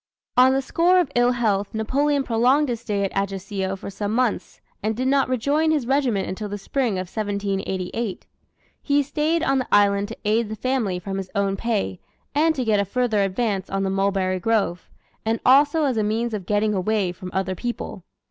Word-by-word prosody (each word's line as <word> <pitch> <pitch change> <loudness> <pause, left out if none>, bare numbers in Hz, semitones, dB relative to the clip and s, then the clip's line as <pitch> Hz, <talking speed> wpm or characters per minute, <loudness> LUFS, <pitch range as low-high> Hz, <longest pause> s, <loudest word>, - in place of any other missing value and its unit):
On 255 +1 +6
the 270 0 0
score 355 +6 +3
of 325 -6 0
ill 245 +1 +3
health 210 -4 0
Napoleon 280 +6 +1
prolonged 255 +5 +2
his 235 -2 -2
stay 205 -4 -1
at 195 - -1
Ajaccio 195 0 -2
for 195 - -8
some 205 +2 -3
months, 250 -3 -1 0.2
and 215 +1 -1
did 255 +1 0
not 270 -1 +2
rejoin 280 +6 +1
his 300 -5 +1
regiment 250 -6 +1
until 205 +2 -5
the 205 - -4
spring 240 +3 -1
of 185 0 -2
1788. 200 0 -3 0.6
He 285 0 +2
stayed 310 +4 0
on 270 -3 +2
the 255 - -3
island 200 0 +4
to 225 - -8
aid 215 +1 +1
the 220 - -4
family 225 -5 -1
from 195 +2 -5
his 190 -1 -5
own 200 -1 +1
pay, 145 - -2 0.3
and 315 +3 +3
to 255 -3 -2
get 215 -2 +3
a - - +3
further 225 0 0
advance 195 0 -1
on 195 0 -1
the 190 - 0
mulberry 195 -1 0
grove; 195 -4 0 0.3
and 225 +1 0
also 290 +4 +5
as 265 -5 +1
a 215 - +2
means 225 +2 -1
of 195 -4 -4
getting 210 +1 +1
away 195 -1 0
from 180 +1 -8
other 190 0 -1
people. 235 -2 -5
220 Hz, 195 wpm, -23 LUFS, 195-255 Hz, 0.6 s, On